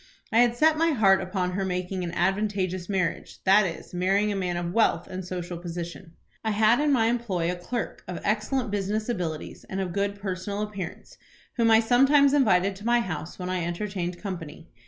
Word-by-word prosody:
I 225 - +4
had 240 -1 +4
set 310 +3 +4
my 330 -1 +3
heart 195 -6 +4
upon 185 -1 -2
her 195 +2 -2
making 180 0 -2
an 170 - -3
advantageous 190 -1 -1
marriage; 190 -3 -2
that 195 +1 +5
is, 165 - -8
marrying 195 +4 +1
a - - -2
man 180 -2 -1
of 175 0 -3
wealth 185 -7 +2
and 185 0 -6
social 175 -1 -5
position. 170 -1 -7 0.3
I 220 - 0
had 220 +3 +4
in 295 0 +2
my 240 -5 +3
employ 215 -8 0
a - - -3
clerk, 225 +7 -5
of 180 - -5
excellent 220 +3 0
business 205 +3 -1
abilities, 170 -9 -4
and 190 - -3
of 185 -3 -2
good 200 +1 -1
personal 200 +1 -3
appearance, 200 -5 -7 0.4
whom 230 -1 +3
I 225 0 +6
sometimes 275 +4 +5
invited 195 -8 +3
to 205 - -12
my 240 0 +4
house 160 -6 -5
when 180 0 -4
I 180 -2 -1
entertained 175 0 -3
company. 170 -5 -7
195 Hz, 195 wpm, -26 LUFS, 180-220 Hz, 0.4 s, I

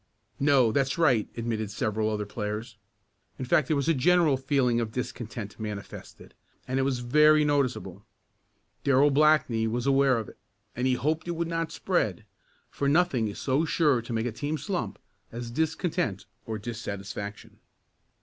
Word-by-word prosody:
"No, 135 -5 +4
that's 135 0 0
right," 130 -10 +3
admitted 115 -2 -2
several 110 0 -1
other 105 -1 -2
players. 105 +2 -5 0.6
In 130 - -4
fact 130 +2 +2
there 155 - +1
was 140 - -1
a 165 - +4
general 160 +1 +4
feeling 130 -3 +1
of 110 -2 -3
discontent 115 -3 -5
manifested, 105 -2 -8 0.3
and 130 +1 0
it - - +3
was 130 -2 0
very 150 +4 +5
noticeable. 140 -4 -1 0.8
Darrell 140 +1 +4
Blackney 140 -6 +3
was 120 +2 -2
aware 135 -2 +4
of 110 - -4
it, - - -14 0.4
and 125 +2 0
he 130 - +2
hoped 155 +6 -1
it 175 - -2
would 170 0 -2
not 165 -1 -2
spread, - - -1 0.5
for 140 - -1
nothing 145 -8 +2
is 100 - -6
so 140 +3 +1
sure 150 -6 +2
to 115 - -9
make 115 0 -1
a 125 - -1
team 145 +7 -3
slump 175 - -3 0.3
as 120 0 -6
discontent 160 - -1 0.2
or 110 -1 -3
dissatisfaction. 105 -2 -6
130 Hz, 160 wpm, -27 LUFS, 110-150 Hz, 0.8 s, very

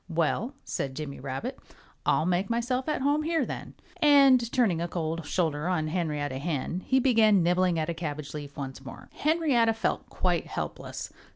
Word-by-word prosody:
"Well," 170 - 0
said 135 -1 -3
Jimmy 145 -2 -6
Rabbit, 135 - -5 0.5
"I'll 155 - +3
make 180 +2 +1
myself 250 +4 -1
at 300 - -1
home 290 +2 +2
here, 320 -3 +1
then." - - -7 0.2
And 275 -7 +5
turning 205 -10 +2
a 170 - -1
cold 165 -2 -3
shoulder 160 -3 0
on 160 -4 0
Henrietta 150 -5 -2
Hen 160 +2 -2
he 265 - +4
began 220 -7 +4
nibbling 180 0 +2
at 155 -1 0
a 170 - -1
cabbage 150 -3 -5
leaf 145 -2 -7
once 135 -1 -6
more. 135 - -10
Henrietta 290 -8 +2
felt 225 - -2
quite - - 0
helpless. - - -5
175 Hz, 170 wpm, -28 LUFS, 155-250 Hz, 0.5 s, And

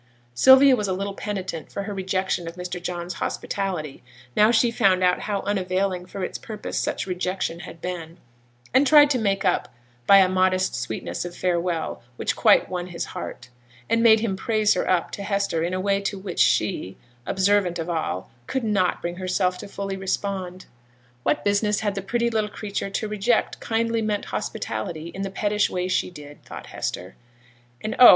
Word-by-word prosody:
Sylvia 265 - +7
was 210 -4 -2
a 190 - 0
little 195 +2 -3
penitent 190 -6 -5
for 200 - -4
her 205 +1 -5
rejection 190 -2 -1
of 165 - -6
Mr. 180 0 -5
John's 175 0 -4
hospitality, 180 -8 -3 0.3
now 210 +1 +6
she 235 0 +4
found 190 -5 +3
out 180 0 +3
how 205 -2 -2
unavailing 185 -2 -1
for 195 0 -6
its - - -4
purpose 215 -2 -5
such - - -2
rejection 180 -2 -2
had 165 -1 -10
been, 170 -2 -5 0.6
and 270 +2 +5
tried 295 0 +7
to 255 - +2
make 195 -2 0
up 180 - +1 0.4
by 200 - +9
a 190 -1 +6
modest 185 0 +2
sweetness - - -4
of 175 0 -7
farewell, 175 -2 -1
which - - -1
quite - - +5
won 180 -1 -4
his 175 -2 -4
heart, 120 - -7 0.4
and 230 - +2
made 220 -2 +6
him 215 -4 0
praise 215 +1 +2
her - - -1
up 180 -2 +1
to - - -6
Hester 200 -4 0
in 170 - -1
a 185 - -1
way 200 +1 +1
to 200 0 -2
which 190 -2 -6
she, 95 - +2 0.3
observant 190 -2 +2
of 165 0 -4
all, 160 - -3 0.2
could 265 - -2
not 200 -5 +1
bring 175 +1 -3
herself 185 0 0
fully 195 -1 -4
to - - -10
respond. 190 -1 -3 0.6
What 145 +4 0
business 205 +1 +2
had 205 -2 0
the 195 - -3
pretty 235 +4 0
little 215 -2 0
creature 205 -1 -4
to 215 +2 -2
reject 210 +2 0
kindly 230 0 0
meant 210 -2 -1
hospitality 155 +10 -4
in 190 - -7
the 195 - -2
pettish 205 +1 +1
way 180 0 -2
she 185 - 0
did, 145 -4 -12
thought - - -9
Hester. 90 +2 -4 0.7
And, 215 - -3
oh! 250 - +11
190 Hz, 185 wpm, -24 LUFS, 180-210 Hz, 0.7 s, oh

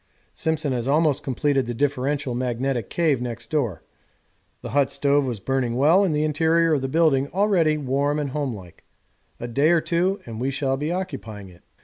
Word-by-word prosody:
Simpson 155 -3 -1
has 120 0 -2
almost 150 0 +2
completed 135 -1 0
the 120 - -4
differential 140 0 -1
magnetic 125 -1 -2
cave 155 -7 +1
next 120 -2 -6
door. 120 - -1 0.8
The - - -6
hut 140 -1 +2
stove 140 0 +1
was 120 -5 -3
burning 125 +1 -1
well 155 +9 +4
and 170 -6 +1
the 150 - +1
interior 160 +2 +2
of 145 - +1
the 135 - -2
building 140 -2 +2
already 180 -4 +2
warm 140 +1 0
and 145 -3 -2
homelike 120 - -5 0.6
a 120 - -5
day 140 +6 +2
or 170 -1 +4
two 180 +5 0
and 115 -1 -7
we 130 - 0
shall 135 -1 -1
be 150 +4 -3
occupying 115 - -5
it. 85 -1 -18
140 Hz, 185 wpm, -23 LUFS, 125-155 Hz, 0.8 s, well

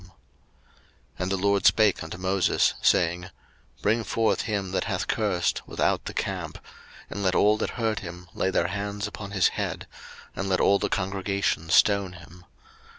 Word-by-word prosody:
03:024:013 - - -21 1.1
And 90 +1 -2
the 95 - +1
LORD 100 +1 +1
spake 110 -4 +4
unto 80 +3 -7
Moses, 95 0 +2
saying, 85 +1 +3
03:024:014 90 - -11 0.5
Bring 115 +2 +2
forth 115 0 +1
him 100 -4 -2
that 95 - 0
hath - - -2
cursed 100 -5 0
without - - 0
the - - -5
camp; - - -3 0.5
and 100 - -4
let 95 -2 +1
all 105 +1 +5
that - - -2
heard 110 -3 -1
him 90 0 -9
lay 95 - 0
their 95 - +1
hands 100 0 -3
upon 100 -1 -7
his 100 -2 +3
head, - - -4 0.5
and 100 - -3
let 95 - +2
all 100 0 +4
the - - -1
congregation 95 -3 -1
stone 100 0 +4
him. 85 +1 -14
95 Hz, 170 wpm, -26 LUFS, 90-100 Hz, 1.1 s, all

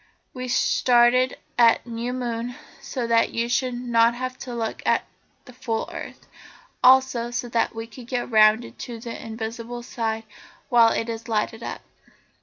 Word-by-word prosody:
We 255 -1 -5
started 245 +1 +3 0.2
at 230 -1 +5
new 235 +1 -4
moon 240 -1 -3 0.3
so 250 -3 -4
that 230 0 +2
you 230 0 0
should 250 0 0 0.2
have 240 +3 +1
a 245 - -5
look 225 -1 -3
at - - +2 0.4
the 250 - -13
full 230 -3 -3
earth, - - -8
and - - -28 0.5
also 255 -2 +5
so 245 0 -3
that 230 -1 0
we 225 0 -5
could 235 +1 -12
get 245 -1 -3
round 215 +1 +4
to 235 -2 -6
the 235 0 -7
invisible 230 +2 -6
side 225 -2 -3 0.5
while 235 -2 +6
it 225 - -1
is 230 0 -5
lighted 225 0 -1
up." - - -6
235 Hz, 160 wpm, -24 LUFS, 230-245 Hz, 0.5 s, while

